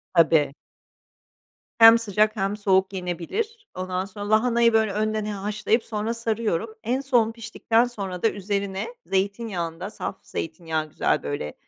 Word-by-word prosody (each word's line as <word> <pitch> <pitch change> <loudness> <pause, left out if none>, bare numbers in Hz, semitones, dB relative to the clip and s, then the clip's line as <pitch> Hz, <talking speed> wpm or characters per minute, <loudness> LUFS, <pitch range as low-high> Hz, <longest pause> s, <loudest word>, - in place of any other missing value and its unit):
Tabii. 160 -4 +4 1.2
Hem 225 0 +9
sıcak 215 0 +1
hem 200 +1 -1
soğuk 190 -1 +2
yenebilir. 195 - -4
Ondan 185 0 -2
sonra 205 +1 -7
lahanayı, 235 +1 +3
böyle, 220 -2 +3
önden 215 +1 -1
he 210 - -3
haşlayıp 210 +3 0
sonra 220 +1 -3
sarıyorum. 225 -3 -1
En 250 +4 0
son, 240 -5 +2
piştikten 230 +1 +1
sonra 195 -6 -6
da 225 - +5
üzerine 200 -1 -3 0.2
zeytinyağında, 190 -3 -2
saf 195 - -6
zeytinyağı 160 -1 -4
güzel, - - 0
böyle, 145 - -4
210 Hz, 135 wpm, -24 LUFS, 185-225 Hz, 1.2 s, Hem